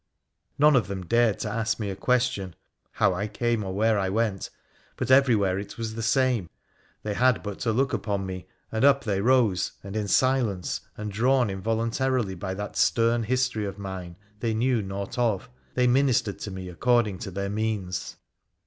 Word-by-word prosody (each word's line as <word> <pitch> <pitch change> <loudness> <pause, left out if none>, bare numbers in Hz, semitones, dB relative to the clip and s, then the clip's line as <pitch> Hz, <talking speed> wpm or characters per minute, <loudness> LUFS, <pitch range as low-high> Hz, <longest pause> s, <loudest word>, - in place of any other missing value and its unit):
None 150 0 +5
of 115 -7 +2
them 95 -2 -5
dared 115 +1 +2
ask 110 +1 -1
me 105 -3 -2
a - - -5
question, 100 -5 0 0.4
how 95 - +2
I 100 +4 -2
came 115 +1 -1
or 95 - -4
where 110 +2 +2
I 95 -1 0
went, 105 -1 -1 0.5
but 130 - -1
every 130 -2 +6
where 95 -2 +1
it 100 0 -8
was 115 -1 -4
the 115 - -5
same. 120 - +1 0.5
They 105 - -2
had 125 +2 +2
but 105 -2 -5
to 115 - 0
look 135 +4 +1
upon 100 -3 -1
me, 95 -1 -6 0.2
and 110 +2 -1
up 140 0 +5
they 100 -4 0
rose, 115 -6 +2
and 100 +1 -7
in 105 -2 -1
silence, 120 -6 +1 0.2
and, 105 0 -5
drawn 120 +1 +2
involuntarily 115 +2 -1
by 95 +1 -5
that 105 +1 -6
stern 115 0 +3
history 125 -2 0
of 100 0 -5
mine 95 -3 -6 0.2
they 115 0 -1
knew 120 0 +1
naught 100 +3 -5
of, 120 0 0 0.2
they 125 - +3
ministered 125 -4 +2
to - - -5
me 95 -1 -6
according 105 +1 +1
to 100 - -5
their 100 +1 -3
means. 100 -5 -3
110 Hz, 185 wpm, -26 LUFS, 95-120 Hz, 0.5 s, every